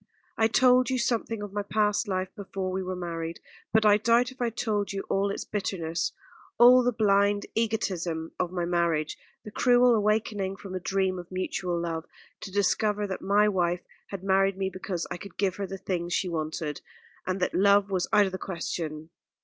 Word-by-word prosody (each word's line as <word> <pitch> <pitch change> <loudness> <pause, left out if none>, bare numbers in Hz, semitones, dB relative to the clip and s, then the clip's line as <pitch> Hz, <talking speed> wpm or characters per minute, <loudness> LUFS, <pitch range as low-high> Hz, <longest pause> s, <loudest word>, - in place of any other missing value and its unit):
I 225 - +3
told 255 +2 +4
you 260 - 0
something 230 -3 -1
of 205 -1 -7
my 205 - -1
past 210 +1 +1
life 185 -1 -1
before 195 -2 -4
we 190 +1 -2
were 185 0 -4
married; 165 -2 -5 0.3
but 220 0 +3
I 210 0 +6
doubt 235 +3 +3
if 260 - -13
I 240 - +2
told 210 -3 -2
you 195 -1 -3
all 200 +1 +1
its 200 - -4
bitterness 175 -5 -2 0.5
all 250 +1 +8
the 245 0 +2
blind 205 -2 +2
egotism 180 -8 -1
of 180 -1 -1
my 175 -2 -2
marriage, 170 -3 0 0.3
the 210 - -9
cruel 245 +2 +4
awakening 210 -2 0
from 195 -1 -9
a 185 - -2
dream 190 0 0
of 175 0 -10
mutual 185 -1 -2
love 165 -1 -3 0.3
to 195 - -8
discover 205 +1 +1
that 190 -2 -5
my 205 +2 +3
wife 175 -3 0 0.3
had 195 -2 -7
married 195 0 +2
me 190 0 -1
because 185 -2 -4
I - - -3
could 200 +2 -11
give 195 -2 0
her 200 -1 -3
the 195 - -6
things 175 -2 -3
she 185 - 0
wanted, 155 -2 -3 0.5
and 185 +1 -1
that 180 - 0
love 200 +1 +4
was 185 -2 0
out 205 -1 +5
of 190 - -3
the 185 - -5
question. 165 -3 -5
195 Hz, 195 wpm, -27 LUFS, 180-210 Hz, 0.5 s, all